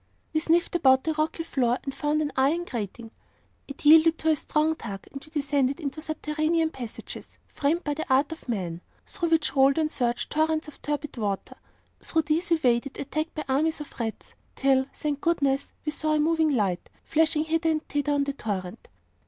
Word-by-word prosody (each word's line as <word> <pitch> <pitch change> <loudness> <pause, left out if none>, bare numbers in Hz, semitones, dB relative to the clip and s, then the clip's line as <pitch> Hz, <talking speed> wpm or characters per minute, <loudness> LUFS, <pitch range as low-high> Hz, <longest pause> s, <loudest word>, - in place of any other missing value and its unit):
We 315 - +3
sniffed 335 +2 +2
about 265 -5 +5
the 320 - 0
rocky 310 +2 -1
floor, 250 -6 +1
and 275 - -4
found 300 +2 0
an 290 - -2
iron 295 +7 +2
grating. 225 - -5 0.6
It 280 +1 -10
yielded 320 +2 +7
to 320 - 0
a - - +4
strong 305 +2 +1
tug, 200 -9 -7
and 275 - -8
we 310 - -15
descended 280 -2 0
into 300 -1 -4
subterranean 310 +1 0
passages, 240 -6 -8
framed 315 +5 -1
by 295 - -1
the 305 -2 -5
art 275 +4 +3
of 320 -5 -9
men, 175 -6 -3 0.2
through 340 - -2
which 310 -4 +2
rolled 270 +1 +5
and 310 -1 +1
surged 240 -1 -1
torrents 315 0 +1
of 300 - -13
turbid 295 -2 -3
water. 200 -4 -3 0.4
Through 320 -1 0
these 320 +4 0
we 335 -1 +3
waded, 245 +2 +1
attacked 310 +3 -3
by 305 - -3
armies 305 +5 +1
of 295 - -8
rats, 225 -2 -4 0.2
till, 265 -1 +3
thank 295 -2 -3
goodness! 280 -5 +1
we 300 - 0
saw 310 0 0
a - - +2
moving 320 +1 +3
light, 200 -10 0
flashing 315 -1 +2
hither 325 +1 +1
and 310 -1 -1
thither 290 0 0
on 285 0 +2
the 280 0 -2
torrent. 195 -8 -5
295 Hz, 195 wpm, -26 LUFS, 265-315 Hz, 0.6 s, yielded